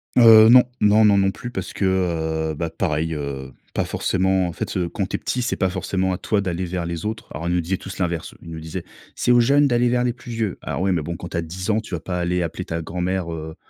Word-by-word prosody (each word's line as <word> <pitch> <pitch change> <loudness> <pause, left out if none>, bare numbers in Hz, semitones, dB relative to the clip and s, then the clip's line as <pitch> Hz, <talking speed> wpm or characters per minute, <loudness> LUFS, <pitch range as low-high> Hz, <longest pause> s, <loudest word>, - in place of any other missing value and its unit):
Heu, 115 -2 +9
non, 125 +1 +9 0.2
non, 105 +1 +5
non, 100 -1 +5
non 95 0 +3
plus 120 +5 -8
parce 95 -6 -5
que 80 -4 0
heu, - - -5
bah 85 +2 -3
pareil, 80 0 -1
heu, 70 -3 -5 0.2
pas - - +1
forcément, 95 -1 +1
en 85 - -5
fait - - -4
heu, 90 -2 0
quand 100 - -2
tu - - -3
es - - -16
petit, 125 - -2
c'est 125 - -1
pas 95 - +1
forcément 95 +1 -1
à 90 - -1
toi 105 +2 0
d'aller 90 -2 -2
vers 90 -1 -3
les 85 0 -4
autres. 110 +1 -4
Alors, 85 - -4
ils 85 - +1
nous 90 - +2
disaient 90 +3 -2
tous 95 +1 -9
l'inverse. 85 -3 -2
Ils 85 - -11
nous 80 -1 -6
disaient: 80 0 -6 0.3
«C'est - - +1
aux 120 - +6
jeunes 140 +4 +4
d'aller 120 -1 +2
vers 125 0 +1
les 125 -1 0
plus 125 0 -11
vieux». 110 -5 -2
Alors - - -3
oui, 95 +1 +2
mais 85 -4 0
bon, 85 +2 -4
quand 85 - -8
tu - - -4
as - - +1
10 95 +5 -6
ans, 110 +1 +2
tu 105 - -11
vas 85 - -1
pas 90 +2 -4
aller 90 +1 0
appeler 85 +2 -4
ta 85 0 -3
grand-mère, 90 +1 -2
heu 80 -1 -6
90 Hz, 280 wpm, -22 LUFS, 85-105 Hz, 0.3 s, Heu